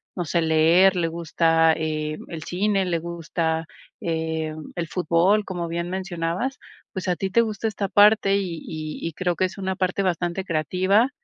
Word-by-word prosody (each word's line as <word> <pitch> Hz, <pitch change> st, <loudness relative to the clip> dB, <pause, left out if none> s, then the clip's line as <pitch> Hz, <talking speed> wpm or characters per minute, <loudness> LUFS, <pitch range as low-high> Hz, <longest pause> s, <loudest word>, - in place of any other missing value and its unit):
no 175 Hz, -, -2 dB
sé, 170 Hz, +2 st, +1 dB
leer, 165 Hz, +4 st, +5 dB
le 170 Hz, -2 st, +1 dB
gusta, 165 Hz, 0 st, +2 dB
eh, 155 Hz, -1 st, -2 dB
el 160 Hz, -2 st, -6 dB
cine, 195 Hz, +2 st, 0 dB
le 170 Hz, -2 st, 0 dB
gusta, 165 Hz, -1 st, -2 dB, 0.4 s
eh, 160 Hz, -1 st, -2 dB, 0.2 s
el 170 Hz, -1 st, -3 dB
fútbol, 180 Hz, +5 st, +2 dB
como 175 Hz, -3 st, -4 dB
bien 170 Hz, +1 st, -3 dB
mencionabas, 185 Hz, +6 st, -3 dB, 0.4 s
pues, 190 Hz, -1 st, -4 dB
a 180 Hz, -, +2 dB
ti 195 Hz, -, -2 dB
te 235 Hz, -, +5 dB
gusta 220 Hz, -1 st, -2 dB
esta 205 Hz, -2 st, -3 dB
parte, 205 Hz, -1 st, +5 dB
y 180 Hz, -5 st, -3 dB
y 155 Hz, 0 st, -5 dB
y 165 Hz, -, -5 dB
creo 180 Hz, +1 st, -1 dB
que 185 Hz, -, +1 dB
es 185 Hz, -, -6 dB
una 190 Hz, -1 st, -2 dB
parte 185 Hz, +1 st, 0 dB
bastante 175 Hz, 0 st, -1 dB
creativa. 185 Hz, -, +2 dB
175 Hz, 175 wpm, -24 LUFS, 165-190 Hz, 0.4 s, leer